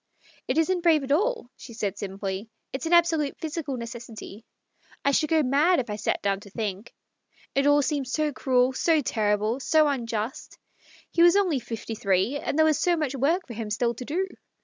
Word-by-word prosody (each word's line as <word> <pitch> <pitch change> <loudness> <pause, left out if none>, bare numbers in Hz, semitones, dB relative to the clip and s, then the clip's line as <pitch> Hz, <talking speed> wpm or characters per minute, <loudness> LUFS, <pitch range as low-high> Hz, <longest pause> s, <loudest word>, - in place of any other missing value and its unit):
" - - -29
It - - 0
isn't 355 +2 +2
brave 325 -4 +4
at 270 - -4
all," 410 - 0
she 235 - -11
said 205 -3 -2
simply. 195 +1 -5
" - - -53
It's 270 +5 -3
an 340 - 0
absolute 330 -4 +3
physical 305 -4 -4
necessity; 230 -2 -8 0.6
I 280 - +4
should 305 +2 +1
go 320 -2 +3
mad 295 +7 +3
if 240 -4 -3
I - - -2
sat 215 - -2
down 195 -1 +1
to 205 0 -13
think. 205 0 -4 0.6
It 275 +1 +2
all 290 0 +5
seems 270 -1 -2
so 305 +1 0
cruel, 255 0 +2
so 315 +3 +2
terrible, 215 0 0
so 310 +2 +3
unjust. 230 -4 -3 0.5
He 335 - +1
was 345 +1 +7
only 365 -9 +2
fifty 230 -1 -6
three, 200 +6 0
and 285 - -3
there 315 - +5
was 310 -2 +2
so 350 -1 +2
much 300 -4 -1
work 310 +8 +1
for 240 - -8
him 220 -1 -5
still 235 +3 0
to 245 - -8
do. 365 +8 -1
265 Hz, 205 wpm, -26 LUFS, 220-315 Hz, 0.6 s, was